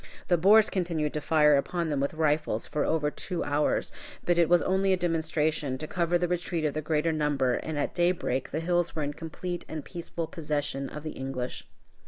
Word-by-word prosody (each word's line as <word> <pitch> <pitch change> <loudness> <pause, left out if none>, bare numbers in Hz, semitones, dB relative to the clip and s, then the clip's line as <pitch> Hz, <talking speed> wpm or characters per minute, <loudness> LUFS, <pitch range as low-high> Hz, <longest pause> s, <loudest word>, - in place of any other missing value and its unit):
The 175 - +5
Boers 205 +5 +6
continued 165 -5 -1
to 150 - -2
fire 150 -1 +5
upon 170 +3 -1
them 145 - 0
with 140 +3 -1
rifles 150 -7 +1
for 150 - -1
over 150 -2 +1
two 175 +1 -4
hours. 145 +1 0 0.3
But 175 -1 +3
it 170 - +4
was 175 0 +5
only 190 +1 +2
a - - +2
demonstration 160 -5 0
to 155 - -5
cover 170 +1 +1
the 175 0 0
retreat 175 -2 -1
of 150 - 0
the 155 - -2
greater 155 +1 +1
number, 145 -5 +1
and 155 +4 -3
at 145 - -1
daybreak 175 -7 0
the 160 - -2
hills 175 0 0
were 155 - -1
in 145 0 -2
complete 170 +3 -5
and 155 -2 -5
peaceful 170 -1 -5
possession 145 -4 -3
of 150 - -8
the 155 - -4
English. 130 -2 -5
160 Hz, 205 wpm, -28 LUFS, 150-175 Hz, 0.3 s, Boers